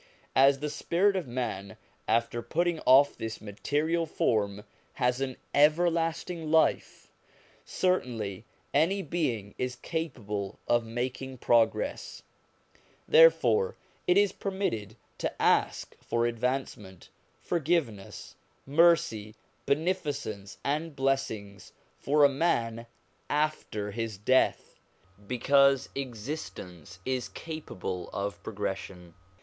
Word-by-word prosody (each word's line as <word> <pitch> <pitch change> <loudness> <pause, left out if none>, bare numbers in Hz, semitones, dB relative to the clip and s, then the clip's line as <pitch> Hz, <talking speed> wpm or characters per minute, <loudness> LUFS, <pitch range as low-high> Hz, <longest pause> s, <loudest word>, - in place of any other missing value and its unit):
As 135 +1 +5
the 150 - -1
spirit 185 +6 +1
of 180 -7 -2
man 115 -6 -4 0.3
after 115 +1 +1
putting 170 +7 0
off 135 +2 +6
this 110 0 -5
material 150 +11 -1
form 105 -7 0 0.3
has 125 +1 0
an 130 -2 -3 0.2
everlasting 165 +2 +2
life, 160 0 +1 0.5
certainly 120 - -1 0.3
any 170 +7 +3
existing 155 - -11
being 115 - -1
is 125 0 -2
capable 110 - -4
of 120 0 +3
making 125 +3 -4
progress; 115 -1 +1 0.8
therefore 475 -1 +5 0.3
it 180 +1 +4
is 205 -1 +4
permitted 115 - -3 0.2
to - - -3
ask - - +1
for 120 0 0
advancement, 120 -5 -3 0.3
forgiveness, 155 - -2 0.3
mercy, 145 -9 +3 0.3
beneficence, 145 - -2
and 150 +2 -2
blessings 110 -7 -2 0.3
for 145 +1 +3
a - - +9
man 120 -6 0 0.4
after 145 -9 -1
his 115 -1 -4
death, 130 +6 +1 0.5
because 140 +2 +3
existence 110 - -7
is 130 -1 -2
capable 95 - -6
of 100 0 -4
pro - - -7
gression. 95 -3 -5
130 Hz, 100 wpm, -29 LUFS, 110-160 Hz, 0.8 s, a